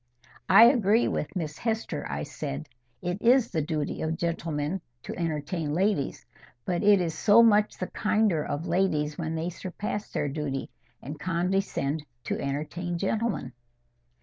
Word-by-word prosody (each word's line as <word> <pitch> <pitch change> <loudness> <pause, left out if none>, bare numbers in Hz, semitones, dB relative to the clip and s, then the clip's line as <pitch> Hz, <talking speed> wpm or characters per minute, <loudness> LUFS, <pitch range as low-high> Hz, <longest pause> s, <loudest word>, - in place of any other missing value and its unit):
"I 200 +4 +9
agree 230 -2 +5
with 150 - -3
Miss 155 -4 -4
Hester," 225 - -2
I 70 +1 -3
said. 70 +1 -5 0.4
"It 180 +2 -2
is 245 +1 +4
the 160 - 0
duty 150 -1 -2
of 160 +1 -1
gentlemen 165 0 -2 0.2
to - - -6
entertain 155 -1 -2
ladies. 190 -6 0 0.4
But 175 -1 0
it 205 -1 +6
is 170 -3 -1
so 225 +2 +6
much 210 -2 +4
the 185 - -2
kinder 210 -6 +1
of 150 +3 -3
ladies 165 -4 0
when 160 -1 -2
they 165 +2 -2
surpass 200 +4 -5
their - - -1
duty, 140 -2 -3 0.3
and 145 +3 -7
condescend 175 -4 -1 0.2
to - - -2
entertain 155 +5 -3
gentlemen." 215 - -1
170 Hz, 150 wpm, -27 LUFS, 150-205 Hz, 0.4 s, I